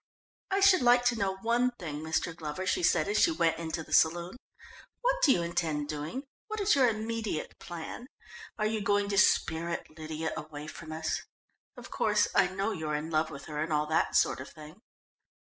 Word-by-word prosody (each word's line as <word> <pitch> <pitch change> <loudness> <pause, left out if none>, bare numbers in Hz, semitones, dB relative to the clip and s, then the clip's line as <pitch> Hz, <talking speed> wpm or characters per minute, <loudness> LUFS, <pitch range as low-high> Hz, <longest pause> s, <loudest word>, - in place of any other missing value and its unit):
"I 390 0 +1
should 390 -4 +6
like 245 0 +5
to 245 -1 +3
know 195 -3 -1
one 240 +2 +2
thing, 155 -5 -5
Mr. 160 +1 -1
Glover," 160 +3 -5
she 185 - +1
said 170 -1 +3
as 205 +1 +1
she - - +5
went 165 - +1
into 160 0 -4
the - - -9
saloon. 170 +4 +3 0.7
"What - - +2
do 290 - +6
you 175 - +2
intend 160 -4 -2
doing? 155 - -4 0.2
What 435 -1 -4
is 405 0 +3
your 265 -4 +5
immediate 220 -5 -3
plan? 175 +8 -7 0.5
Are 215 - 0
you 215 0 0
going 205 0 +1
to 200 - -1
spirit 170 -2 +2
Lydia 160 0 -4
away 150 -1 -7
from 155 0 -9
us? 160 0 -2 0.6
Of - - -11
course, - - +2
I - - +4
know 195 +3 -2
you're 155 -5 -3
in 155 +2 -4
love 155 0 +1
with 140 -3 -9
her 150 -1 -4
and 160 +1 -2
all 150 0 +2
that 160 - +1
sort - - +3
of - - -9
thing." 155 +5 -13
170 Hz, 200 wpm, -30 LUFS, 155-225 Hz, 0.7 s, should